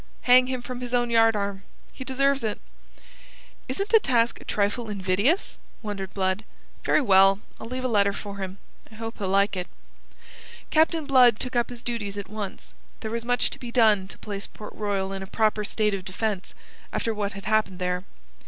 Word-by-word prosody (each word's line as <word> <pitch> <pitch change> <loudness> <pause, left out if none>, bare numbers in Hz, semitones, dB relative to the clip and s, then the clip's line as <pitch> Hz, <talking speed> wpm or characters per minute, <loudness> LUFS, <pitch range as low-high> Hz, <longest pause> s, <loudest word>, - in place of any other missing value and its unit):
Hang 250 0 +6
him 255 -1 -3
from 250 0 -6
his 245 0 -2
own 240 -1 +1
yardarm. 210 -4 +3 0.3
He 260 - -7
deserves 275 +1 +1
it." 215 -2 -2 1.1
"Isn't 400 +1 -2
the 450 - +7
task 240 - +1
a - - -13
trifle 210 +3 -1
invidious?" 200 - 0 0.2
wondered 200 -3 -5
Blood. 190 +1 0 0.4
"Very - - +3
well. 195 -4 +6 0.2
I'll - - -7
leave 255 +2 -4
a - - +1
letter 200 -4 +3
for 200 0 -7
him. 190 0 -5 0.3
I - - -13
hope 225 +1 -6
he'll 195 -2 -2
like 200 +1 +3
it." 180 -1 -3 1.0
Captain 320 0 +3
Blood 250 -5 +6
took 255 -1 -4
up 240 -1 +2
his 245 -1 -9
duties 210 -4 -3
at 200 -2 -6
once. 210 -3 -6 0.3
There 220 - -4
was 230 0 -2
much 245 +1 +1
to - - -8
be 240 -2 -7
done 215 -6 +4
to - - -9
place 200 -2 -6
Port 210 - -10
Royal 195 -2 -2
in 195 - -5
a 190 - -6
proper 215 0 +1
state 210 0 0
of 195 -2 -3
defence, 195 +1 -3 0.4
after 225 - -1
what 205 -1 -2
had 195 -1 -9
happened 215 -3 +1
there. 180 0 -1
215 Hz, 190 wpm, -26 LUFS, 195-245 Hz, 1.1 s, the